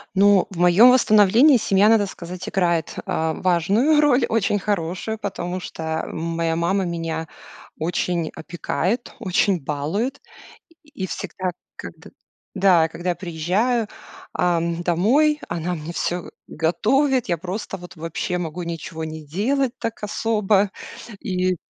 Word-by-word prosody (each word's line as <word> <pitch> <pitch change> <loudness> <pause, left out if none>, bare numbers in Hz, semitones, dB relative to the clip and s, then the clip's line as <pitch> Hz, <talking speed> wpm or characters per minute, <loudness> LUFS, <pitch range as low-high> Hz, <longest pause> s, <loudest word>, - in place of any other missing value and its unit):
Ну, 200 -1 +5
в 185 - -9
моем 180 +8 +7
восстановлении 235 +3 +6
семья, 200 -1 +3
надо 220 -2 +4
сказать, 180 -1 -8
играет, 170 -4 0
а, 160 0 -1
важную 200 - +2
роль, 270 -4 +4
очень 205 -2 +1
хорошую, 195 +2 -2
потому 185 -3 -4
что 160 -2 -4
моя 165 0 -2
мама 185 +3 +1
меня 165 -2 -3 0.5
очень 170 0 -1
опекает, 175 - -3
очень 190 -1 +1
балует. 160 - -2 0.6
И 295 - -27 0.2
и - - -1
всегда, 185 0 -4 0.2
когд - - -10 0.5
да, 180 -4 +4
когда 175 +2 -3
я - - 0
приезжаю, 195 +7 0 0.4
ам, 170 -1 0
домой, 245 - +3
она 170 +1 -2
мне 155 +2 -7
всё 175 0 -3 0.2
готовит. 235 - +1
Я 170 - +1
просто 190 +4 -5
вот 180 0 -12
вообще 165 +2 -3
могу 175 +1 -4
ничего 165 -1 -5
не 155 0 -7
делать 245 - 0
так 230 -2 -5
особо 210 -2 +1 0.5
и 185 -1 -1
180 Hz, 130 wpm, -22 LUFS, 170-215 Hz, 0.6 s, моем